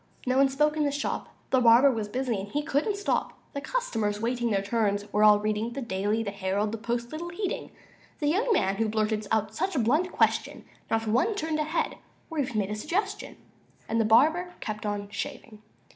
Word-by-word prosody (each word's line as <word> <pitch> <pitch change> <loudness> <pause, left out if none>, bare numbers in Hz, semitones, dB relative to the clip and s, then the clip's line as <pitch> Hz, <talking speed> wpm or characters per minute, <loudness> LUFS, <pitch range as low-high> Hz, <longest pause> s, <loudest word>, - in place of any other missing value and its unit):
No 255 0 +1
one 275 0 +5
spoke 300 +3 +2
in 310 - +1
the 290 - +2
shop, 285 0 -3 0.2
The 260 - +4
barber 240 +4 +7
was 220 -4 -3
busy, 250 +2 -1
and 195 - -5
he 290 +9 -2
couldn't 315 +8 0
stop; 405 - -1 0.2
The 280 - -4
customers, 225 - -1
waiting 240 +1 0
their 195 -2 +1
turns, 205 -1 0
were 210 +1 +3
all 210 -1 +8
reading 215 +2 -1
The 275 - -4
"Daily," 210 +1 -1
the 200 - -3
"Herald," 200 +1 -1
the 225 - -4
"Post," 235 +1 -3
little 335 +3 -5
heeding 385 +2 -3 0.5
The 295 - -3
young 405 +11 +2
man 195 - +2
who 225 -1 +1
blurted 215 -1 0
out 215 -1 +1
such 375 - -2
a - - +2
blunt 300 +11 +2
question; - - 0 0.2
Not 225 0 0
one 225 - +2
raised - - -4 0.2
a 305 - +1
head, 315 +3 -1 0.3
or 320 - -3
even 260 -5 -1
made 205 -1 0
a - - -1
suggestion; 390 - -3 0.5
And 230 0 +1
the - - +3
barber 315 +11 +4
kept 215 -1 -4
on 205 -1 -3
shaving. 215 +2 -6
230 Hz, 210 wpm, -27 LUFS, 210-295 Hz, 0.5 s, all